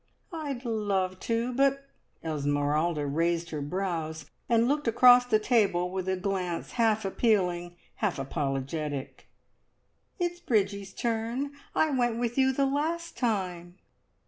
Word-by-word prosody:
"I'd 285 -6 -4
love 200 -5 -1
to, 230 +2 0
but 275 +1 +2 0.2
" - - -40
Esmeralda 150 +1 0
raised 165 +4 0
her 150 -2 -3
brows, 160 -2 -3 0.2
and 230 0 +4
looked 290 0 0
across 245 +2 +7
the 220 - +4
table 205 -6 +2
with 190 0 -3
a 190 - 0
glance 185 -3 -2
half 220 -3 +2
appealing, 180 -5 +1 0.2
half 210 -5 0
apologetic 135 +1 -3 0.9
"it's 350 -1 -2
Bridgie's 200 - 0
turn! 235 +4 -2 0.2
I 315 - +3
went 240 -4 +1
with 240 0 -1
you 265 -1 +4
the 275 +1 +1
last 320 +5 -1
time." 180 -7 -2
200 Hz, 130 wpm, -28 LUFS, 170-245 Hz, 0.9 s, across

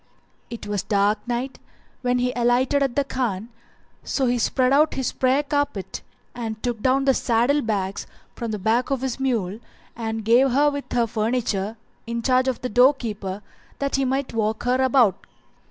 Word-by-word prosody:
It 235 -2 -7
was 205 -2 -1
dark 205 0 +1
night 245 +2 -3 0.4
when 250 0 +1
he 250 0 0
alighted 245 +4 +2
at 270 -3 0
the 285 - +2
Khan, 235 -6 -3 0.5
so 270 - 0
he 245 0 +1
spread 255 +2 +2
out 305 +3 +4
his 265 -2 -1
prayer 265 +3 +2
carpet 285 -9 -2 0.3
and 225 -3 -4
took 240 -3 -2
down 265 +2 +2
the 270 - +5
saddle 245 +5 +2
bags 200 -4 -2 0.3
from 235 - -5
the 215 - -2
back 225 +5 +1
of 270 -2 -1
the 260 -2 -2
mule 225 -7 -1 0.4
and 225 -1 -4
gave 245 +4 +5
her 290 +2 +4
with 285 0 -6
her 240 -1 +3
furniture 220 -2 -1 0.3
in 235 0 -3
charge 255 +1 +3
of 260 -3 -1
the 255 - -2
door 250 +5 +5
keeper 205 -5 -5 0.3
that 280 0 -1
he 275 - +1
might 265 0 -1
walk 220 -1 -1
her 250 +1 +2
about. 245 -7 +3
245 Hz, 180 wpm, -23 LUFS, 220-265 Hz, 0.5 s, the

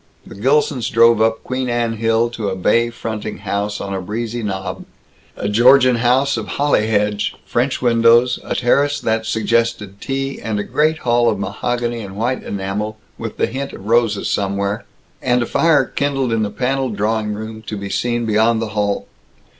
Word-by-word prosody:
The - - -11
Gilsons 130 +3 +1
drove 115 -1 +5
up 110 0 +1
Queen 130 0 -2
Anne 120 -1 -1
Hill 115 +1 +1
to 110 -4 -3
a 95 - -3
bay 115 +5 +2
fronting 110 -2 -5
house 100 +1 -3
on 100 0 -4
a 95 - -3
breezy 115 +5 -4
knob 95 -3 -4 0.5
a - - -2
Georgian 125 +4 +5
house 130 +4 +2
of - - -4
holly 140 -7 +2
hedge, 105 -1 0
French 130 +2 -1
windows, 120 +1 +4
a - - -3
terrace 145 +3 +2
that 110 0 -1
suggested 110 -3 0
tea, 135 0 -3
and 110 -2 -2
a - - -1
great 155 +6 +1
hall 120 -3 +2
of 105 - -1
mahogany 120 +4 -2
and 95 -2 -8
white 120 +5 -1
enamel 100 +2 -4 0.2
with - - -6
the - - +2
hint 135 +1 -5
of 95 - -10
roses 115 -2 +2
somewhere, 100 0 -1 0.4
and 125 -1 +2
a - - -2
fire 160 0 +3
kindled 135 -4 -1
in 115 - +1
the 105 - 0
paneled 130 0 -1
drawing 105 0 0
room 110 +1 -7
to 105 - -4
be 100 0 -6
seen 120 +1 -1
beyond 110 +1 +2
the 115 -1 -3
hall. 105 -1 -1
115 Hz, 180 wpm, -19 LUFS, 105-125 Hz, 0.5 s, drove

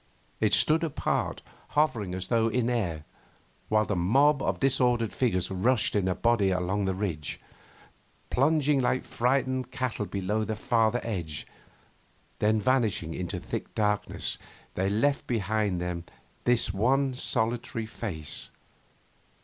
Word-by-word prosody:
It 110 -1 +4
stood 160 +2 +4
apart, 160 -4 -1 0.3
hovering 110 -12 +1
as 95 0 -3
though 115 +1 +2
in 120 +1 0
air, 85 -11 -1 0.7
while 110 0 +3
the 105 - -1
mob 135 +11 +3
of - - -1
disordered 125 -4 +2
figures 95 -8 0
rushed 110 +6 +2
in 100 -3 +1
a 90 - 0
body 115 -2 +2
along 95 +2 0
the 95 -1 0
ridge. 90 -7 -3 0.9
Plunging 145 0 +3
like 125 +1 +1
frightened 130 0 0
cattle 125 -5 -3
below 100 +3 -1
the 110 0 -2
farther 115 0 +1
edge, 85 -10 -4 0.9
then 110 +1 +3
vanishing 105 -8 +1
into 90 -1 -4
thick - - -6
darkness, 105 -1 0 0.3
they 95 +1 0
left 140 +8 +1
behind 105 -4 0
them 90 -1 -4 0.4
this 120 -5 +2
one 130 +6 +2
solitary 115 -2 0
face. 85 -9 -5
110 Hz, 130 wpm, -28 LUFS, 95-125 Hz, 0.9 s, It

